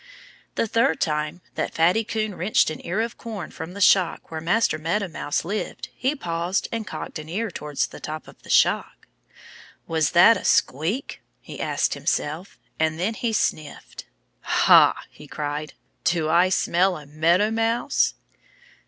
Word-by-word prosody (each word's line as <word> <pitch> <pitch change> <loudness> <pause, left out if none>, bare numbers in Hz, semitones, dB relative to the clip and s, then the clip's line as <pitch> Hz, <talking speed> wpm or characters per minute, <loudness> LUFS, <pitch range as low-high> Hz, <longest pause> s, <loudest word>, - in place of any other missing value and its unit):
The - - +1
third 225 -7 +1
time 150 +2 -1
that - - -3
Fatty 180 +7 +3
Coon 215 -1 -2
wrenched 180 -2 +2
an 155 - -8
ear 190 +6 -1
of 230 0 -4
corn 215 -8 -6
from 160 +2 -8
the 200 - -8
shock 185 -4 +3
where 160 -1 -4
Master 175 -1 +1
Meadow 180 +6 -1
Mouse 160 -3 -3
lived 205 +4 -4
he 265 +4 -1
paused 175 - -2
and 225 -1 -4
cocked - - -6
an 155 0 -9
ear 210 +4 -2
towards 150 -3 -2
the - - -11
top 155 0 -6
of - - -16
the - - -16
shock. - - +2 0.8
"Was 160 -2 0
that 185 +6 +7
a - - -8
squeak?" 170 - 0 0.2
he - - -9
asked - - 0
himself. 155 +6 -3 0.2
And 160 0 0
then 200 +6 0
he 230 +1 -2
sniffed. 155 -8 -3 0.4
"Ha!" - - +5
he 150 - -14
cried. 150 +1 -4 0.3
"Do 165 -2 +1
I 175 +3 +4
smell 185 0 +2
a 150 - -11
Meadow 170 +8 +2
Mouse?" 225 +4 +1
175 Hz, 160 wpm, -24 LUFS, 155-215 Hz, 0.8 s, that